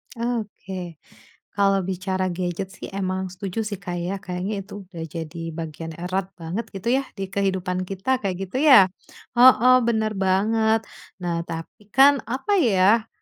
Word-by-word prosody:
Oke, 205 -7 -4 0.6
kalau 195 -1 +3
bicara 185 0 -1
gadget 180 +1 -3
sih - - -8
emang 190 -1 -2
setuju 190 +3 -4
sih, 205 -3 -5
Kak, 180 -2 -5
ya, 180 +3 -3
kayaknya 190 +2 -4
itu 200 0 -9
udah 175 -3 -8
jadi 165 +1 -6
bagian 160 0 -6
erat 185 +2 -3
banget 175 +7 -4
gitu 210 +5 -1
ya, 275 - -6
di 195 -1 -5
kehidupan 185 -2 -1
kita 205 +7 -1
kayak 195 -5 -2
gitu 195 +8 -3
ya? 260 -11 +7 0.5
Heeh, 255 0 +8
bener 220 -2 +1
banget. 220 +4 +2 0.4
Nah, 170 -1 -2
tapi 165 +5 -8
kan 275 +1 +7
apa 270 - 0
ya, 215 - +4
195 Hz, 150 wpm, -23 LUFS, 180-220 Hz, 0.6 s, Heeh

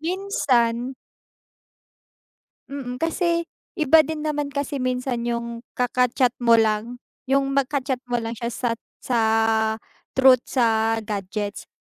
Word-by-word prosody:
minsan. 265 - 0 1.7
Mm, 265 -3 -5
kasi 335 +3 0 0.3
iba 315 -1 +6
din 310 0 -2
naman 295 -2 -1
kasi 280 -1 -3
minsan 255 -1 -1
yung 235 0 -3 0.2
kaka-chat 250 +1 +2
mo 235 -1 +6
lang 220 +2 +1 0.3
yung 275 0 +2
magka-chat 275 -1 0
mo 245 - +1
lang 225 0 -4
siya 235 +1 -3
sa 240 0 -1 0.3
sa 240 -2 +1 1.0
truth 260 -2 +6
sa 225 -3 +2
gadgets 205 0 -4
255 Hz, 110 wpm, -23 LUFS, 235-280 Hz, 1.7 s, iba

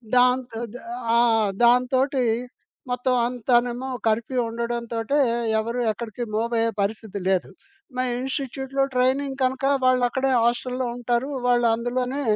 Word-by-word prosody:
దాంతో 250 -2 +2 0.6
ఆ! - - +5
ఆ! - - +5 0.4
దాంతోటి 255 +2 +3 0.7
మొత్తం 250 +1 +1
అంతానేమో 245 +1 0 0.2
కర్ఫ్యూ 230 +4 0
ఉండడంతోటే, 235 +2 -2 0.4
ఎవరు 230 +3 -2
ఎక్కడికి 235 +1 -6
మూవ్ 230 +2 -1
అయ్యే 230 0 +2
పరిస్థితి 205 0 -3
లేదు. 185 -2 +1 0.5
మా 255 - +1 0.2
ఇన్‌స్టిట్యూట్‌లో 270 0 -2
ట్రైనింగ్ 265 +2 +1
కనుక 260 +1 0 0.2
వాళ్ళు 255 -1 +4
అక్కడే 265 +1 0
హాస్టల్‌లో 250 +1 0
ఉంటారు. 245 +3 -1 0.2
వాళ్లందులోనే 245 +3 +1
245 Hz, 110 wpm, -24 LUFS, 235-260 Hz, 0.7 s, ఆ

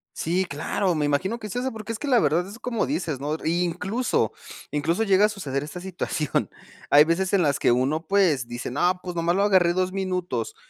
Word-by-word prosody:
Sí, 180 +4 0
claro, 175 +4 -1
me 150 -1 0
imagino 190 +11 0
que 215 - -6
es 210 - -7
eso, 255 +2 -1
porque 220 0 -7
es 220 - -6
que 295 - -4
la 250 -4 +4
verdad 175 -2 +2
es 205 +4 -10
como 240 -3 -1
dices, 165 - -2
¿no? 150 +3 -2
Y 170 +2 +1
incluso 195 +8 -1 0.4
incluso 160 +8 0
llega 200 -1 +4
a 215 - +2
suceder 140 -10 -3
esta 155 +4 -7
situación. 175 -5 -2 0.4
Hay 150 +1 +7
veces 180 +3 0
en 195 - +4
las 145 -4 +2
que - - +3
uno, 140 +7 +1
pues, 170 -11 +2
dice: 120 0 -5
"No, 180 +7 +1
pues, 180 -1 -6
nomás 170 +1 +1
lo 200 - +2
agarré 185 -4 +4
2 185 0 0
minutos", 185 - -2
180 Hz, 220 wpm, -24 LUFS, 155-200 Hz, 0.4 s, Hay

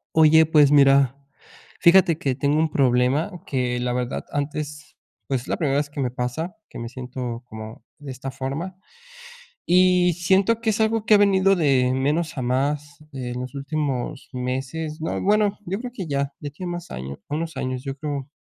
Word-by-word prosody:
Oye, 160 0 +7
pues 150 -2 +5
mira, 140 -2 +5 0.6
fíjate 170 -2 +5
que 135 -6 -1
tengo 145 +3 +1
un 160 - +2
problema 130 +5 +2 0.2
que 125 -2 -1
la 125 0 -1
verdad 125 +1 -2
antes 145 0 -4 0.3
pues 135 -3 -1
es - - -15
la - - -1
primera 140 -4 +1
vez 145 0 -1
que 145 - -8
me 125 -2 -1
pasa 125 +8 -3
que - - -10
me 115 - -5
siento 125 -1 -6
como 110 0 -9
de 145 -3 -8
esta 130 +1 -6
forma 140 +8 -5 0.9
y 180 0 +4
siento 190 +6 +2
que 225 -1 +1
es 215 - -1
algo 220 0 +1
que 215 - +6
ha - - +7
venido 195 -1 +4
de 135 -7 +2
menos 150 +5 0
a - - -1
más 145 +4 -1
en 125 -2 -5
los 125 +1 -6
últimos 140 -1 -3
meses 135 +5 -4
no, 160 - -2
bueno, 205 0 +2
yo 190 +3 -2
creo 245 +1 -6
que 190 -8 -5
ya 140 0 -1
ya 145 - -5
tiene 175 +4 -6
más 175 0 -7
años, 65 +2 -6
unos 160 +2 -3
años, 130 0 -3
yo 135 -1 -4
creo, 140 -2 -4
145 Hz, 185 wpm, -23 LUFS, 130-170 Hz, 0.9 s, Oye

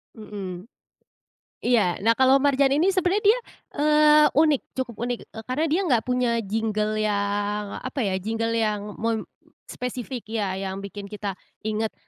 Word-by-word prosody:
Mmm. 195 -5 -7 1.0
Iya 220 -8 +2
nah 225 - +4
kalau 265 +1 +5
Marjan 275 -1 +3
ini 340 +6 +3
sebenarnya 375 +2 +1
dia, 430 +4 +5 0.4
eee, 300 0 +6
unik 305 -2 +4 0.2
cukup 235 -4 -10
unik, 245 -1 -2
eee, 220 0 -9
karena 265 +5 0
dia 330 +5 +2
nggak 245 -8 +3
punya 250 -1 +1
jingle 215 +1 -1
yang 205 0 0
apa 260 +2 -5
ya 190 -3 0
jingle 225 +3 -2
yang 220 -2 0 0.2
mem 225 0 0 0.5
spesifik 250 -1 -5
ya, 205 -4 -2
yang 195 0 -4
bikin 200 0 -7
kita 200 -2 -5 0.2
inget. 215 0 -2
225 Hz, 150 wpm, -24 LUFS, 205-270 Hz, 1.0 s, eee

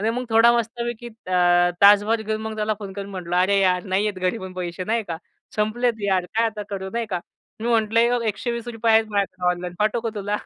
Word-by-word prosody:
आणि 220 +2 +1
मग 250 +2 -3
थोडा 225 +1 +6
मस्तपैकी 235 +1 -3 0.2
अ, 175 -1 +3
तासभर 205 +3 +6
घेऊन 215 0 -3
मग 220 0 -5
त्याला 215 0 0
फोन 200 -2 -7
करून 200 0 -7
म्हटलं, 180 -2 -4
"अरे 190 +2 +3
यार, 180 -2 +2
नाहीयेत 200 +2 0
घरी 185 +5 -1
पण 190 -2 -8
पैसे 180 0 -4
नाही 225 +2 0
का, 165 - -3 0.4
संपलेत 220 +1 0
यार 190 -2 +1
काय 230 +1 +3
आता 215 -2 -4
करू?" 190 -1 -5
नाही 235 -1 -2
का 180 -2 -1 0.4
मी 230 - -2
म्हटलं," 230 +1 +2
₹120 230 +1 -1
आहेत 220 0 +4
माझ्याकडे 190 -3 -1
ऑनलाईन 180 0 -4
पाठवू 215 +3 +1
का 230 - -1
तुला?" 205 0 -2
210 Hz, 205 wpm, -23 LUFS, 185-225 Hz, 0.4 s, थोडा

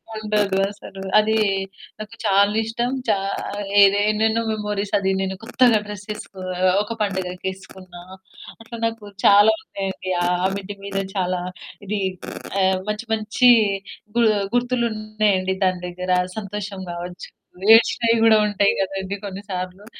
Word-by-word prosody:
ఉండదు 210 -2 0
అసలు. 195 -1 -11 0.2
అది. 220 +1 +2 0.6
నాకు 215 +1 -8
చాలిష్టం, 220 +4 +2 0.2
చా 210 -2 +3 0.7
ఎదో 200 +1 +5
ఎన్నెన్నో 220 +1 +1
మెమోరీస్ 210 -1 -3
అది 190 -1 0
నేను 190 0 -2
కొత్తగా 235 -1 +3
డ్రెస్సెసుకు 210 -1 -8 0.4
ఒక 210 - -5
పండుగకేసుకున్న 190 -1 -5 0.7
అట్లా 235 +1 -9
నాకు 230 -1 -3 0.2
చాలా 205 +2 +7
ఉన్నాయండి. 190 -1 -5
ఆ 180 +1 +1
మిడ్డి 200 0 -6
మీదే 195 0 -2
చాలా 180 -1 -1 0.5
ఇది, 210 +1 -1 0.6
ఆహ్ 190 0 +2
మంచి 210 +3 -3
మంచి 220 +3 +3 0.7
గు - - +4 0.3
గుర్తులున్నాయండి 215 -6 0
దాని 185 -1 0
దగ్గర 180 +1 -4 0.3
సంతోషం 205 -1 -5
కావచ్చు, 175 +1 -7 0.5
ఏడ్చినవి 230 0 +3
కూడా 220 -1 +7
ఉంటాయి 205 -1 +2
కదండీ 195 0 -3
కొన్ని 195 +1 -7
సార్లు. 185 +2 -5
205 Hz, 115 wpm, -22 LUFS, 190-215 Hz, 0.7 s, చాలా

